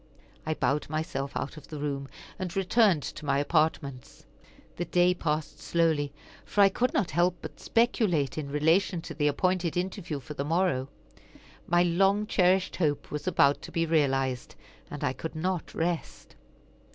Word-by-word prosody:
I 155 - 0
bowed 145 0 0
myself 155 -3 -3
out 145 - -4
of 145 - -11
the 155 - -7
room, 140 -1 -3 0.3
and 185 -1 -4
returned 195 - +3
to - - -7
my 140 -1 +1
apartments. 145 -3 -1 0.5
The 175 - -2
day 180 +1 +3
passed 155 -3 -2
slowly, 160 -3 +1 0.3
for 205 - +1
I 200 - +8
could 245 +5 0
not 185 - 0
help 175 +1 +2
but - - -9
speculate 205 - +1
in 150 -3 -4
relation 165 +5 +2
to - - -7
the 150 -2 +1
appointed 175 +3 0
interview 180 -4 -3
for 140 +3 -9
the 140 - -3
morrow. 150 -4 0 0.8
My 175 0 +4
long 195 +4 +2
cherished 185 -2 +2
hope 150 -5 -1
was 150 - -5
about 140 0 +3
to - - -9
be 165 0 0
realized, 135 -5 0 0.3
and - - -6
I - - +1
could 160 +5 -6
not 180 +2 -2
rest. 170 0 -3
160 Hz, 165 wpm, -28 LUFS, 145-180 Hz, 0.8 s, I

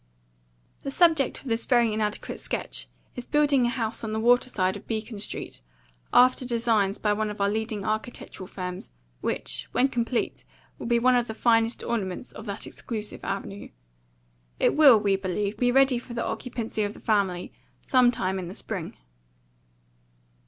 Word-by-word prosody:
"The 275 - -5
subject 315 -2 +3
of - - -12
this 230 -1 0
very 235 -3 +4
inadequate 210 -1 -2
sketch - - -3 0.3
is 245 - -7
building 290 -4 +3
a - - +1
house 225 -3 -3
on 215 -1 -3
the 220 - -1
water 245 +2 +4
side 185 -4 0
of 205 - -10
Beacon 220 -1 -4
Street, 205 - -6 0.5
after 255 +1 +5
designs 230 -5 +1
by 210 -1 +1
one 215 0 -1
of 210 - -7
our 200 0 +2
leading 220 -1 -2
architectural 215 -3 -4
firms, 180 -1 -6 0.3
which, - - -3
when 265 +2 +3
complete, 240 -1 -1 0.4
will - - -5
be 235 0 +3
one 250 +2 +4
of 245 -1 +2
the 220 - -5
finest 230 0 +2
ornaments 210 -1 -3
of 220 - -10
that 200 0 -4
exclusive 215 -3 -6
avenue. 195 0 -5 0.9
It - - +3
will, 275 -7 +8
we 200 -2 +2
believe, 200 +2 -2
be 245 +2 +2
ready 265 -1 +4
for 240 0 -10
the 235 - -1
occupancy 225 -1 -3
of 205 0 -2
the - - -12
family 195 -5 0 0.3
sometime 240 -7 +3
in 180 - -5
the 185 - -8
spring." 190 -8 -5
225 Hz, 165 wpm, -26 LUFS, 205-245 Hz, 0.9 s, will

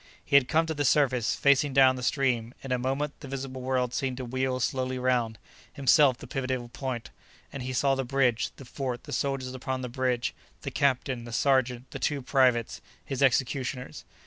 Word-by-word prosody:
He - - 0
had 140 -3 +6
come 160 +2 +2
to 160 - -2
the 145 -1 -1
surface 130 -4 +2
facing 140 0 +3
down 130 -1 +6
the 125 - -6
stream; 125 -3 0
in 135 - -6
a 125 - +1
moment 135 +3 -2
the - - -9
visible 135 -1 -5
world 125 -1 0
seemed 130 -2 -2
to 130 - -4
wheel 130 +1 -1
slowly 130 0 -1
round, 125 -3 0 0.4
himself 140 -2 +4
the - - -10
pivotal 130 -2 -3
point, 125 -2 -5 0.4
and 140 - -5
he 130 +1 -4
saw 135 +2 +2
the 135 0 -1
bridge, 125 -2 +1
the 135 - -12
fort, 125 -1 -4
the - - -8
soldiers 135 -2 -2
upon 130 0 -3
the 125 - -4
bridge, 125 -1 -1 0.3
the - - -4
captain, 130 -3 0
the 120 - -8
sergeant, 130 0 +1
the - - -6
two 145 -3 -1
privates, 125 -5 +2 0.2
his 135 -2 -4
executioners. 130 - 0
130 Hz, 195 wpm, -28 LUFS, 125-135 Hz, 0.4 s, had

